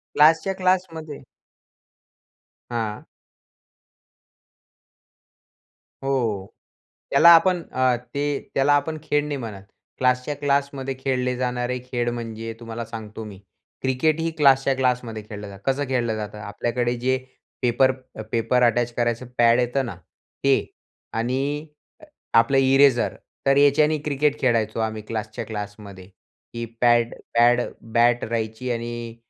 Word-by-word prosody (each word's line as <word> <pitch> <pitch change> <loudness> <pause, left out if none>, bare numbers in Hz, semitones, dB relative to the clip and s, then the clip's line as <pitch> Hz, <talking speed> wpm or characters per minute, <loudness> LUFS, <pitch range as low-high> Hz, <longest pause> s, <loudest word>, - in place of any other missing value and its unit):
क्लासच्या 160 +5 +5
क्लासमध्ये. 180 -5 -1 1.5
हां. 110 -3 -3 3.0
हो. 120 -8 -1 0.6
त्याला 170 - +6
आपण 175 +1 +4
अ, 130 -1 +2
ते 140 +4 -3 0.2
त्याला 135 +2 +3
आपण 155 +2 0
खेळ 150 -1 +1
नाही 150 -1 -3
म्हणत. 105 -6 -7 0.4
क्लासच्या 125 +3 +1
क्लासमध्ये 140 -1 -1
खेळले 125 -1 -1
जाणारे 125 0 -1
खेळ 120 -1 0
म्हणजे 115 -1 -5
तुम्हाला 115 0 -6
सांगतो 110 -1 -8
मी 100 -3 -10 0.4
क्रिकेट 135 +5 +1
ही 165 0 0
क्लासच्या 135 -2 +4
क्लासमध्ये 125 -4 -1
खेळलं 105 -1 -8
जातं. 100 0 -12
कसं 145 +2 -2
खेळलं 120 -4 0
जातं? 105 0 -6
आपल्याकडे 120 +4 -2
जे 130 +2 +1 0.4
पेपर 125 +2 +3 0.2
अ, 110 - -6
पेपर 120 +2 +2
अटॅच 120 0 +2
करायचं 120 +1 -1
पॅड 120 0 +5
येतं 125 +2 0
ना 105 - -6 0.5
ते. 135 -1 +3 0.5
आणि 135 +6 -1 0.7
अ, - - +5
आपलं 115 +4 +2
इरेजर 135 -2 +4 0.3
तर 135 0 +5
याच्याने 150 +2 +4
क्रिकेट 150 0 +1
खेळायचो 115 -3 +1
आम्ही, 110 -1 -2
क्लासच्या 110 0 -5
क्लासमध्ये. 105 -3 -8 0.5
ही 115 0 -3 0.2
पॅड 120 -1 +4 0.2
पॅड 120 +1 +5 0.3
बॅट 120 +1 +4
राहायची 115 +2 -3
आणि 120 0 -4
125 Hz, 120 wpm, -23 LUFS, 115-140 Hz, 3.0 s, त्याला